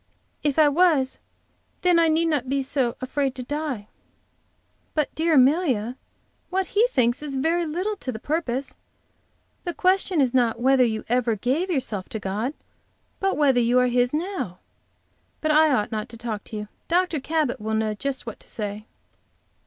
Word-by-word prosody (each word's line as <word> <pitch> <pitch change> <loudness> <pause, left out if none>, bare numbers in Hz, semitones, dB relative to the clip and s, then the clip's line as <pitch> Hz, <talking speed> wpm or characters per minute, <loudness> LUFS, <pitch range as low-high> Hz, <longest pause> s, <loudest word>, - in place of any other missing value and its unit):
If 290 -1 0
I 310 -1 +6
was, 290 -4 +3 0.6
then 355 -2 +5
I 330 - +4
need 320 +1 +2
not 290 -6 0
be 275 0 +1
so 260 -3 0
afraid 265 +1 -1
to 255 - -5
die." 285 -6 -4 1.1
"But, 305 -2 0
dear 325 0 +2
Amelia, 260 - +3 0.5
what 380 +1 0
he 435 +4 +5
thinks 250 - +1
is 290 -2 -5
very 330 +5 +1
little 365 +7 -2
to 260 - -4
the 220 - -6
purpose. 275 -1 -2 0.9
The 345 - -4
question 370 -2 +2
is 260 -3 +2
not 240 -3 +2
whether 260 +1 +4
you 220 -2 -1
ever 240 -1 +1
gave 265 - 0
yourself 230 - -2
to 220 - -4
God, 210 +8 -3 0.6
but 390 0 0
whether 275 -4 +4
you 240 +1 +3
are 250 0 +4
His 245 0 +2
now. 320 - -3 0.8
But 310 - +1
I 310 0 +5
ought 210 -6 +1
not 215 -1 -3
to 230 - -10
talk 225 -3 -4
to - - -8
you. 210 0 -5 0.2
Dr. 350 -2 +1
Cabot 300 -4 -1
will 220 +1 -1
know 220 -1 0
just 270 +5 -4
what 225 - -7
to - - -11
say." 210 0 -5
270 Hz, 175 wpm, -24 LUFS, 235-315 Hz, 1.1 s, I